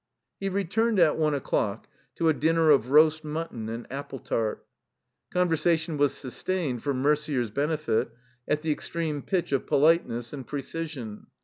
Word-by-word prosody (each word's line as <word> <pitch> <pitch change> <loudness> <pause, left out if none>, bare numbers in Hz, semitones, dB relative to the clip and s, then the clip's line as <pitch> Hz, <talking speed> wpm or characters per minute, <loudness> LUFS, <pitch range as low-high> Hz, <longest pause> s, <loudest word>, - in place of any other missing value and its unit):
He 195 - -1
returned, 200 +4 0
at 165 -4 +5
one 155 -2 +2
o'clock, 110 -6 -1 0.3
to 165 - +1
a 160 - +5
dinner 160 +1 +3
of 130 -4 +3
roast 155 +2 +5
mutton 150 -8 -4
and 115 +1 -5
apple 140 0 -5
tart. 110 -3 -2 0.7
Conversation 165 -2 +1
was 145 -1 +3
sus 130 - -4
tained, 160 -11 -1
for 145 - -1
Mercier's 140 -3 +1
benefit, 150 -1 0 0.4
at 150 +1 0
the 160 - +1
extreme 155 -1 -3
pitch 175 -2 -1
of 135 - 0
politeness 140 -6 +2
and 135 -3 -7
precision. 140 -6 -5
150 Hz, 150 wpm, -27 LUFS, 135-165 Hz, 0.7 s, at